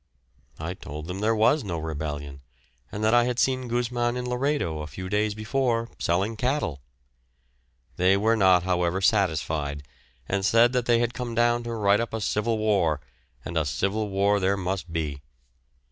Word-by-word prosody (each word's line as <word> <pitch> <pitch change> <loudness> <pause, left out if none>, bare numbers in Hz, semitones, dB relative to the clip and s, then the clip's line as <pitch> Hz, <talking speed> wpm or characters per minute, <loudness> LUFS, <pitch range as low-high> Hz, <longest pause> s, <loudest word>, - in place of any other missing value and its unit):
I 80 +3 -4
told 75 -4 -8
them 90 +3 -5
there 110 +2 +2
was 115 +7 +3
no 90 -5 -3
rebellion, 75 -3 -5 0.5
and 105 - -4
that 110 +1 +3
I 120 0 +5
had 125 -1 -1
seen 130 -1 +1
Gusman 120 0 -1
in 125 0 -3
Laredo 125 - -1
a 75 - -5
few 95 +5 -7
days 105 +1 0
before, 115 +1 -1
selling 95 +6 0
cattle. 125 - -1 1.2
They 95 +2 +4
were 110 +3 +2
not, 95 -4 +4
however, 90 0 0
satisfied, 80 -8 0 0.4
and 100 0 -1
said 115 +4 +4
that 125 -2 0
they 120 -1 +5
had 120 0 0
come 120 -2 -5
down 120 +1 +3
to 120 - -3
write 105 -2 +3
up 115 -1 -3
a - - -2
civil 110 +2 0
war, 100 -8 +1 0.5
and 85 - -6
a 80 - +2
civil 100 +9 -1
war 100 +1 +2
there 100 +1 +1
must 90 -2 -3
be. 75 -4 -3
100 Hz, 175 wpm, -26 LUFS, 85-120 Hz, 1.2 s, I